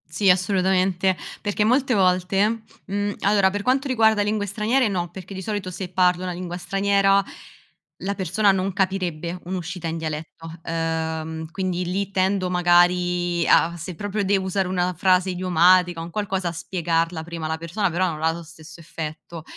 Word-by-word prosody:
Sì, 175 +6 +1
assolutamente, 185 0 +2 0.3
perché 205 0 0
molte 255 +4 +2
volte, 195 +3 +2 0.2
mhmm, 205 +1 -2
allora 200 -1 +4
per 205 +1 -3
quanto 265 +6 +1
riguarda 220 -4 +3
lingue 205 0 0
straniere 220 +4 +1
no, 175 -3 -2
perché 185 +2 -10
di 190 - -6
solito 195 -2 -4
se 185 +1 -5
parlo 180 0 +2
una 180 -1 -3
lingua 175 0 -5
straniera 195 +2 +2 0.8
la 200 +1 -1
persona 195 +3 +2
non 190 0 -1
capirebbe 180 -3 -2
un'uscita 180 -1 -5
in 165 0 -3
dialetto, 160 +1 -6
ehm, 160 -1 -3
quindi 180 -1 -2
lì 190 +2 -2
tendo 190 -1 0
magari 175 0 +2
a 170 +1 +4
se 170 +2 -6
proprio 205 +3 -2
devo 195 -1 +1
usare 190 0 0
una 180 -1 -1
frase 185 +1 +3
idiomatica, 180 -1 +3
un 165 - -6
qualcosa, 190 -1 -2
a - - -4
spiegarla 165 -1 -1
prima 165 -1 -6
alla 160 0 -2
persona, 175 +4 -1
però 185 +3 +1
non 155 -1 -5
ha 160 - +3
lo 170 +1 -7
stesso 160 0 -13
effetto. 160 0 -7
185 Hz, 165 wpm, -23 LUFS, 170-195 Hz, 0.8 s, allora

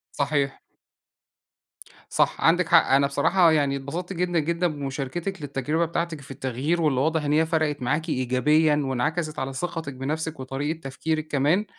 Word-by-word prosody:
صحيح. 140 -1 0 1.5
صح، - - +1
عندِك 175 +1 +4
حق، 165 0 +5
أنا 140 +1 +5
بصراحة، 165 +5 +3
يعني، 145 -3 +2
اتبسطت 160 +7 -5
جدًا 175 -1 0
جدًا 170 +3 0
بمشاركتِك 150 +5 -4
للتجربة 145 +4 -1
بتاعتِك 170 -2 -3
في 135 - -12
التغيير، 135 +6 -1
واللي 140 -5 +2
واضح 160 +1 +1
إن 145 0 0
هي 160 +1 +4
فرقت 155 -3 0
معاكِ 155 +6 -1
إيجابيًا 150 +4 +2
وانعكست 155 +5 -1
على 130 0 -3
ثقتِك 165 -1 -4
بنفسِك 155 +4 -3
وطريقة 140 +5 -3
تفكيرِك 155 +2 -3
كمان، 155 +8 +2
150 Hz, 150 wpm, -25 LUFS, 135-165 Hz, 1.5 s, حق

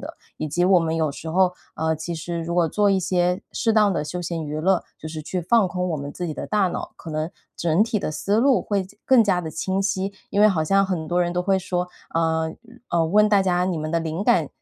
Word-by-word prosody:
的。 - - -8 0.2
以 155 - -3
及 175 +4 +1
我 185 -1 +5
们 165 0 -1
有 155 -3 0
时 160 - -8
候， 180 +2 +3 0.2
呃， 160 0 0
其 160 +2 -5
实 170 +1 -4
如 170 +1 -3
果 175 -1 +3
做 205 +4 +2
一 195 - +3
些 180 0 0
适 225 - +1
当 210 -2 +4
的 165 - -1
休 155 +4 -5
闲 170 -1 -3
娱 150 0 -4
乐， 185 +2 +2 0.2
就 155 - -7
是 155 -1 -6
去 180 +4 -3
放 215 +2 +3
空 180 0 -2
我 160 - -1
们 140 0 -5
自 180 - -4
己 160 - -3
的 - - -5
大 210 -2 +2
脑， - - -5
可 165 - -9
能 155 +1 -2 0.3
整 170 +3 +2
体 225 -1 -1
的 185 - -3
思 195 +7 -1
路 265 -1 +4
会 200 -2 0
加 195 +2 -15
更 260 -3 +6
加 195 -4 +1
地 160 - -5
清 190 +4 -2
晰。 195 0 -1 0.2
因 200 - +1
为 215 - +7
好 165 -6 +1
像 195 +5 +3
很 180 -5 -2
多 175 +2 +1
人 175 0 -1
都 180 - +1
会 195 +1 +2
说， 180 -1 -2 0.3
嗯 160 0 0 0.3
呃， 170 -1 +2
问 210 +5 +4
大 205 -2 +4
家： 180 -1 +1
“你 185 -2 -1
们 155 0 -3
的 165 0 +1
灵 165 +4 -3
感 175 - +3
175 Hz, 285 characters per minute, -23 LUFS, 160-195 Hz, 0.3 s, 为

